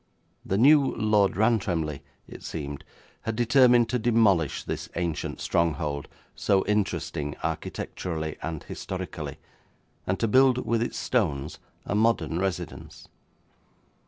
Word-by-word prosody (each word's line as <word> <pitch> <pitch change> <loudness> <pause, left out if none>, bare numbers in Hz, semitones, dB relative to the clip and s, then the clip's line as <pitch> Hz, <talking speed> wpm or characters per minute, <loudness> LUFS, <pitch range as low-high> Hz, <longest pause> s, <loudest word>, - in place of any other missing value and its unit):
The 95 - -1
new 140 +4 +5
Lord 105 -4 +2
Rantremly, 90 -10 +1 0.3
it - - -11
seemed, 70 -3 -6 0.4
had 110 - -3
determined 120 0 +5
to 125 - 0
demolish 105 - +2
this - - -5
ancient 85 -2 -3
stronghold, 75 -3 -1 0.3
so 95 -1 +1
interesting 95 -8 -1
architecturally 80 0 -4
and 80 -2 -4
historically, - - -6 0.7
and 95 - 0
to 115 - +1
build 130 +2 +4
with 115 -1 +1
its 120 - -2
stones 80 - -1 0.3
a - - -2
modern 105 -7 +1
residence. 95 -2 -5
100 Hz, 115 wpm, -26 LUFS, 80-115 Hz, 0.7 s, new